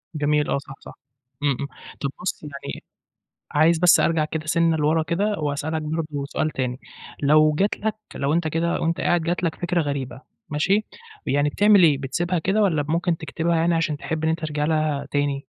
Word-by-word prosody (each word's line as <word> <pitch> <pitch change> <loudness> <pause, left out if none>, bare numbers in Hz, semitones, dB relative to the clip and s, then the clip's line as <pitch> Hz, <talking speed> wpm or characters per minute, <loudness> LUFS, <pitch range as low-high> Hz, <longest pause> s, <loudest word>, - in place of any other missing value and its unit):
جميل، 150 0 +1
آه، - - +1
صح، 135 0 -8
صح - - -12 0.5
إمم، 145 - +3
إمم 140 - -3 0.3
طَب 140 - 0
بُصّ 180 - -3
يعني 140 -2 -7 0.7
عايز 160 +3 +4
بس 175 0 +6
أرجع 165 -2 +2
كده 155 0 -5
سِنّة 165 0 +2
لورا 155 +1 +2
كده، 200 +7 -1
وأسأل 145 +1 -2
لك 160 - -1
برضه 150 -2 -3
سؤال 155 - -1
تاني، 125 -2 -3 0.4
لو 155 +1 +5
جَت 195 +7 +1
لك 220 0 -1 0.2
لو 140 +1 -1
أنت 165 0 +1
كده 165 +2 0
وأنت 165 +1 0
قاعد 175 - +2
جَت 175 +2 -1
لك 165 -3 0
فِكرة 175 0 -1
غريبة 135 -4 -4 0.3
ماشي، 195 +8 +1 0.4
يعني 145 +1 +2
بتعمل 205 +4 +5
إيه 150 -5 +5
بتسيبها 175 +6 -1
كده 195 +6 +1
والَّا 160 -7 +2
ممكن 170 +1 +1
تكتبها 165 0 -1
يعني 165 +1 +2
علشان 165 -2 0
تحب 160 +2 -4
إن 160 - +2
أنت 160 - 0
ترجع 150 -1 -2
لها 155 -2 0
تاني؟ 145 -1 -1
155 Hz, 190 wpm, -23 LUFS, 145-170 Hz, 0.7 s, بس